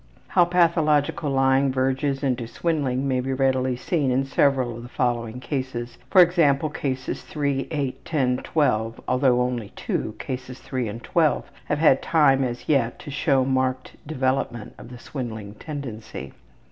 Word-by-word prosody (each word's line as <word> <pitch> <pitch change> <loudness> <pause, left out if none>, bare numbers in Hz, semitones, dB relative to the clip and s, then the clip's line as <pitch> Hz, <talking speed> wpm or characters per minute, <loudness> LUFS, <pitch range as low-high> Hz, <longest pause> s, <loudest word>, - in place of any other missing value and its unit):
How 175 - +5
pathological 160 -4 +2
lying 135 0 +3
verges 135 +2 0
into 125 -4 -1
swindling 140 -3 -1
may 130 -1 +1
be 130 +1 -2
readily 130 -1 +1
seen 140 +2 0
in 130 +2 +1
several 135 -3 +2
of 120 - -8
the 120 - -10
following 120 -2 -1
cases, 125 -2 -4 0.2
e.g., 170 -5 +6 0.2
Cases 130 -2 -3
3, 140 -3 -2
8, 145 -5 -3
10, 130 -6 +1
12, 115 -7 0
although 125 -1 +3
only 120 -4 -3
two, - - -3
Cases 130 0 -6
3 130 -3 -3
and 115 +3 -7
12, 160 -3 +1
have 150 - 0
had 150 -3 +4
time 135 -5 +4
as 120 -1 -4
yet 130 -6 +2
to 145 - -9
show 135 -2 +2
marked 130 -1 -1
development 130 -5 -1
of - - -11
the 125 - -9
swindling 110 -6 -6
tendency. 115 - -7
130 Hz, 150 wpm, -24 LUFS, 125-145 Hz, 0.2 s, e.g